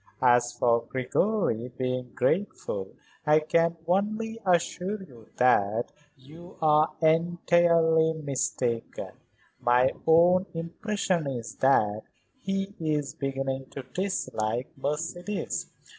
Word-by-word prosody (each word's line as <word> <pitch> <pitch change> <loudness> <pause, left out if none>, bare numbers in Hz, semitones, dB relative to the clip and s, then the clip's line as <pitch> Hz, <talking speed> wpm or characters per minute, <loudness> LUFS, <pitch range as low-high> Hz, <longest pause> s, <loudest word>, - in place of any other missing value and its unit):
As 120 -1 +4
for 115 -1 +2
Gregory 130 - 0
being 125 -1 -3
grateful 130 - -1 0.4
I 150 -1 +5
can 165 +2 +1
only 215 +5 -1
assure 185 +2 0
you 120 - -15
that 115 -2 +2 0.3
you 160 +7 -14
are 155 -1 +4
entirely 165 0 +3
mistaken. 130 -6 -3 0.5
My 125 +2 +3 0.2
own 175 +3 +5
impression 175 0 -2
is 120 -5 -5
that 110 -6 +3 0.4
he 195 -1 -2
is 150 -3 -1
beginning 135 -1 -3
to 135 - -7
dislike 125 - -2
Mercedes. 165 +8 -3
155 Hz, 100 wpm, -27 LUFS, 125-175 Hz, 0.5 s, I